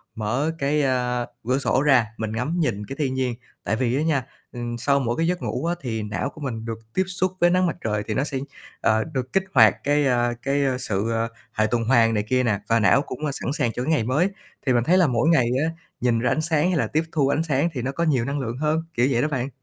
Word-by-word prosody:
mở 120 +9 -1
cái, 145 +2 +1
a, 125 -2 0 0.2
cửa 130 +2 +2
sổ 135 -1 +1
ra 130 -7 +4
mình 110 -1 -3
ngắm 135 +10 -2
nhìn 105 -9 -1
cái 135 - -7
thiên 135 -3 0
nhiên. 130 -2 -1 0.3
Tại - - 0
vì 125 +1 0
á 145 - +1
nha, 150 -5 +1 0.3
ừm, 120 -1 -5
sau 140 +4 +2
mỗi 120 0 -1
cái 165 +1 +1
giấc 180 0 -1
ngủ - - -3
á, 170 +1 0
thì 115 -4 -3
não 105 +5 -3
của 155 - -14
mình 115 -5 -4
được 115 -1 -5
tiếp 190 - +2
xúc 185 0 0
với 175 - +5
nắng 185 +1 +3
mặt - - -2
trời 105 -1 -1
thì 110 - -1
nó 135 - +1
sẽ, 140 -2 -3 0.4
ờ, 110 0 +3
được 130 -5 -5
kích 195 - +3
hoạt 110 -6 +7
cái, 145 0 +2
a, 120 -1 +2
cái 140 +1 0 0.2
sự, 110 -2 -1
ờ, 115 0 0 0.3
hệ 110 0 +1
tuần 120 0 0
hoàn 115 -1 +4
này 105 -1 0
kia 130 +4 +1
nè 105 -5 +1
và 115 0 +4
não 105 +6 +4
cũng 130 - -7
sẵn 140 - -3
sàng 120 -6 0
cho 125 - -3
cái 155 - 0
ngày 150 - +2
mới. 145 - +1 0.4
Thì 130 - +3
mình 120 - +2
thấy 175 +8 +4
là 180 -3 +5
mỗi 125 +3 +2
ngày 130 -8 +4 0.2
á, 160 - +1 0.3
nhìn 120 -2 +2
ra 125 +1 +1
ánh 155 - +1
sáng 160 +1 +2
hay 180 - +1
là - - +1
tiếp 155 +2 0
thu 145 -4 +2
ánh 145 +3 +1
sáng 150 +1 +1
thì 125 - -3
nó 135 +2 -2
có 170 - -2
nhiều 135 -8 +2
năng 140 +2 -2
lượng 120 -2 -4
hơn 155 +3 0
kiểu 120 0 +2
vậy 120 -2 +2
đó 150 - +1
bạn. 130 -3 -2
130 Hz, 270 wpm, -23 LUFS, 115-150 Hz, 0.4 s, hoạt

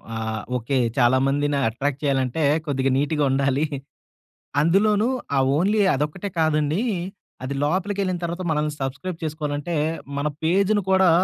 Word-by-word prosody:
ఆహ్, 110 -1 -3 0.2
ఓకే. 130 +3 -1 0.2
చాలా 125 +1 +4
మందిని 145 +1 +1
అట్రాక్ట్ 135 +5 -2
చేయాలంటే 135 +2 0 0.2
కొద్దిగా 135 -2 0
నీట్‌గా 150 +1 +1
ఉండాలి. 135 +2 +1 1.0
అందులోనూ 205 +6 +3 0.3
ఆ - - +5 0.2
ఓన్లీ 205 +5 +2
అదొక్కటే 150 +8 -3
కాదండి. 155 +3 +1 0.6
అది 135 +2 -3
లోపలికెళ్ళిన 185 +2 0
తరువాత 170 +2 -3
మనల్ని 150 0 0
సబ్స్‌క్రైబ్ 160 +7 -4
చేసుకోవాలంటే 150 +1 -3 0.4
మన 145 +1 0 0.2
పేజును 200 +5 +2
కూడా 190 -1 +5
150 Hz, 125 wpm, -23 LUFS, 140-185 Hz, 1.0 s, ఆ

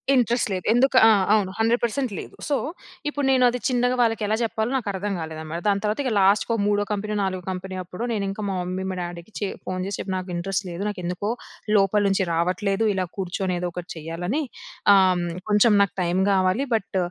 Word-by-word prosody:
Interest 240 -1 +2
లేదు. 185 -1 -4
ఎందుకు 260 +2 +3
ఆ! - - +8 0.2
అవును. 200 -3 +2
100% 235 +2 +1
లేదు. - - -9
సో, 290 - +2 0.5
ఇప్పుడు 290 -1 -2
నేను 260 -1 +4
అది 250 - -3
చిన్నగా 245 0 +1
వాళ్ళకి 225 -2 +1
ఎలా 215 - +2
చెప్పాలో 225 +1 -1
నాకు 235 -5 -5
అర్థం 200 +2 -2
కాలేదనమాట. 160 0 -5
దాని 200 -1 +2
తర్వాత 215 +4 0
ఇగ 255 - -1
లాస్ట్‌కొ 200 +4 +3
మూడో 205 0 +2
కంపెనీ, 210 +1 -2
నాలుగో 185 -1 -2
కంపెనీ 185 +1 -5
అప్పుడు 180 +5 -7
నేను 205 -3 -1
ఇంకా 195 +2 -5
మా 190 - -2
మమ్మీ 185 +1 -3
మా - - -4
డ్యాడీకి 175 +3 -7
చే 205 - -1 0.2
ఫోన్ 185 0 -2
చేసి 195 0 -3
చెప్పి. 190 - -3
నాకు 185 0 -6
ఇంట్రెస్ట్ 195 +3 -2
లేదు, 175 +2 -6
నాకు 205 - -6
ఎందుకో 180 +4 -2 0.5
లోపల 200 +1 +4
నుంచి 195 0 +2
రావట్లేదు. 190 +5 0
ఇలా 185 -1 -1
కూర్చొని 185 0 -2
ఏదో 180 0 -2
ఒకటి 180 -1 -7
చేయాలని. 170 - -3 0.5
ఆహ్, 185 -2 +4 0.3
కొంచెం 210 +2 +5
నాకు 200 - +2
టైమ్ 180 +1 +1
కావాలి. 190 +7 +2
బట్ 205 -3 -1
195 Hz, 195 wpm, -24 LUFS, 185-220 Hz, 0.5 s, ఆ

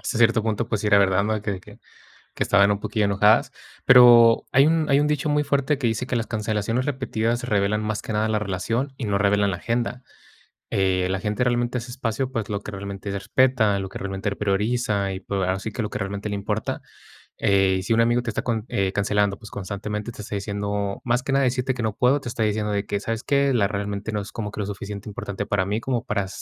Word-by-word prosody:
hasta 120 - -3
cierto 115 -1 +4
punto, 110 +1 -1
pues, 110 -3 -1
sí 105 - -2
era 100 -1 +5
verdad, 95 0 +3
¿no?, 110 +1 0
de 105 - -4
que 105 - -2
de 95 - -6
que - - -15 0.6
que - - -1
estaban 100 0 +4
un 100 - 0
poquillo 105 0 -1
enojadas. 100 +2 +3 0.3
Pero 120 -2 +7
hay 135 +3 +6
un 160 -1 +2
hay 140 0 +4
un 150 - +2
dicho 150 0 0
muy 150 0 +2
fuerte 140 +1 +1
que 130 -3 -2
dice 115 +2 -1
que 130 - -1
las 115 -1 -1
cancelaciones 110 +3 -1
repetidas 120 -4 -1
revelan 105 -1 +1
más 110 -1 -2
que 110 - -5
nada 105 +1 +1
la 110 - +1
relación 115 +7 -2
y 130 - -5
no 100 -2 0
revelan 100 0 +2
la 90 - -3
agenda. 120 +4 -2 0.7
Eh, 95 -1 +1
la 95 - 0
gente 105 +4 -1
realmente 120 0 0
hace 120 +1 -7
espacio, 125 0 -2
pues, 115 -5 -3
lo 100 -1 -2
que 105 - -8
realmente 100 0 -6
respeta, 110 +1 +2
lo 95 0 -4
que - - -8
realmente 95 +1 -3
prioriza, 105 0 0
y 95 - -6
pues, 100 +1 -3
ahora 95 0 0
sí 110 - -4
que 125 - -5
lo 105 - -1
que 105 - -5
realmente 100 +1 -4
le 105 - -3
importa. 105 +2 -3 0.5
Eh, 95 -1 +3
y - - -6
si 105 - -1
un 115 - +4
amigo 120 +1 +3
te 120 - -3
está 105 - -2
con 110 -3 -2
eh, 95 -1 0
cancelando, 100 0 +1
pues, 110 -2 -12
constantemente 105 +3 -5
te 105 - -9
está 105 - -6
diciendo 100 0 -3
más 125 +1 +1
que 135 - -3
nada 135 0 +3
decirte 125 +1 0
que 120 - -4
no 110 -2 -1
puedo, 125 +3 +3
te 120 - -5
está 115 -1 -1
diciendo 105 0 -1
de 100 0 -1
que: 100 - -1
"¿Sabes 115 +2 -3
qué? 140 -1 +2
La 105 -6 +2
realmente 100 +1 -3
no 105 -1 -1
es 100 - -10
como 110 -3 -4
que 105 - -7
lo - - -1
suficiente 100 +1 -6
importante 100 -2 -5
para 95 -2 0
mí, 105 +3 -1
como 125 0 -1
para 100 -5 -1
105 Hz, 250 wpm, -23 LUFS, 100-120 Hz, 0.7 s, Pero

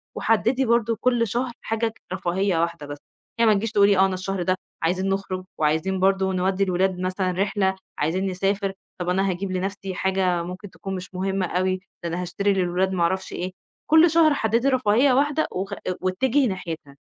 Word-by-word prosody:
وحدّدي 235 +4 +2
برضه 230 -1 +2
كل 240 -2 +2
شهر 240 +4 -2
حاجة 225 +1 -1
ج - - -4 0.2
رفاهيّة 185 -1 0
واحدة 170 -2 -2
بس، 145 0 -6 0.4
يعني 230 -2 +5
ما 210 - +4
تجيش 220 +2 -2
تقولي 200 -2 +4
آه، 190 - +6
أنا 190 - -1
الشهر 190 0 -3
ده 185 +1 +1 0.3
عايزين 185 +4 0
نخرج 190 -1 -2
وعايزين 160 +5 +1
برضه 190 0 +2
نودّي 190 +1 +1
الولاد 185 0 0
مثلًا 185 0 -1
رحلة، 190 +1 0 0.2
عايزين 170 +6 0
نسافر، 195 +1 -1 0.3
طَب 180 0 -2
أنا 190 +2 +1
هاجيب 185 +1 -3
لنَفْسي 190 +1 -3
حاجة 185 -2 +1
ممكن 180 +3 -7
تكون 195 +1 -6
مش 185 +1 -8
مهمة 190 +1 -1
أوي، 185 +2 0 0.3
ده 170 - -2
أنا 175 +2 -3
هاشتري 200 +3 0
للولاد 185 0 0
ما 175 -2 +1
أعرفش 190 +3 -1
إيه، 185 +1 -3 0.4
كل 320 +2 +7
شهر 320 -2 +5
حدّدي 230 0 +1
رفاهيّة 255 +1 +3
واحدة 290 +4 +2
وخ 195 +2 -4
آآ - - -6 0.2
واتجهي 250 +9 +2
ناحيتها. 165 -7 -6
190 Hz, 185 wpm, -24 LUFS, 185-210 Hz, 0.4 s, كل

